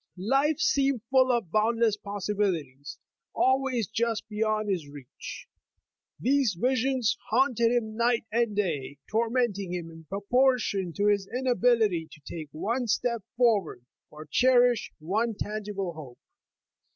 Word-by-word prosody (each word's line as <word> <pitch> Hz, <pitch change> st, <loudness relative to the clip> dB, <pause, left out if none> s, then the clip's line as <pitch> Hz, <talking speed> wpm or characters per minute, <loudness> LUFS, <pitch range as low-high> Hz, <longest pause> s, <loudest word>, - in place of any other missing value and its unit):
Life 270 Hz, -, +1 dB
seemed 275 Hz, -4 st, +1 dB
full 260 Hz, -1 st, +5 dB
of 230 Hz, -9 st, -1 dB
boundless 225 Hz, +1 st, +2 dB
possibilities, 185 Hz, -10 st, -3 dB, 0.4 s
always 260 Hz, -3 st, +2 dB
just 225 Hz, 0 st, -1 dB
beyond 215 Hz, 0 st, -1 dB
his 180 Hz, -7 st, -2 dB
reach. 145 Hz, -, -10 dB, 0.7 s
These 265 Hz, -6 st, +2 dB
visions 255 Hz, 0 st, +1 dB
haunted 235 Hz, -1 st, +3 dB
him 220 Hz, -3 st, -1 dB
night 235 Hz, -1 st, +1 dB
and 230 Hz, -2 st, +1 dB
day, 150 Hz, -9 st, -2 dB
tormenting 225 Hz, -4 st, 0 dB
him 170 Hz, -2 st, -5 dB
in 160 Hz, 0 st, -13 dB
proportion 205 Hz, -, +1 dB
to 205 Hz, -, -1 dB
his 200 Hz, -2 st, +2 dB
inability 240 Hz, -9 st, +2 dB
to 155 Hz, -, -15 dB
take 155 Hz, +1 st, -8 dB
one 235 Hz, +10 st, -2 dB
step 235 Hz, +1 st, 0 dB, 0.2 s
forward, 205 Hz, -, +1 dB, 0.2 s
or 155 Hz, +1 st, -11 dB
cherish 245 Hz, 0 st, +3 dB
one 215 Hz, +8 st, -1 dB
tangible 205 Hz, -4 st, -4 dB
hope. 140 Hz, -6 st, -11 dB
215 Hz, 125 wpm, -27 LUFS, 185-245 Hz, 0.7 s, full